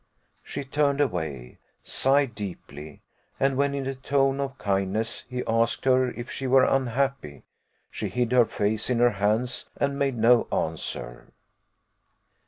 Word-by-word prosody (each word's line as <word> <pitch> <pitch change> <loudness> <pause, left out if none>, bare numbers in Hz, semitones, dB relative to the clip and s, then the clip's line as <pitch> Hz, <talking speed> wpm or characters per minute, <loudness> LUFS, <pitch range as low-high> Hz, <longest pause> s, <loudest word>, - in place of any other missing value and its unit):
She - - -6
turned 140 +1 0
away 80 - -2 0.2
sighed 135 -2 +2
deeply; 80 -7 -8 0.4
and 135 0 +2
when, 140 +1 +1
in 140 -1 -3
a 135 - -2
tone 135 +1 +1
of 135 -1 -3
kindness, 100 +3 -1
he 125 0 -3
asked 115 +2 0
her 130 -1 +4
if 120 +1 -7
she 135 - -4
were 130 0 +5
unhappy, 135 - -1 0.5
she - - -4
hid 125 -1 -1
her 125 -2 +5
face 105 +1 -1
in 125 - +1
her 120 0 +4
hands, 110 +5 -1
and 140 0 -1
made 135 -3 0
no 115 +2 +4
answer. 65 -6 -3
125 Hz, 145 wpm, -26 LUFS, 105-135 Hz, 0.5 s, were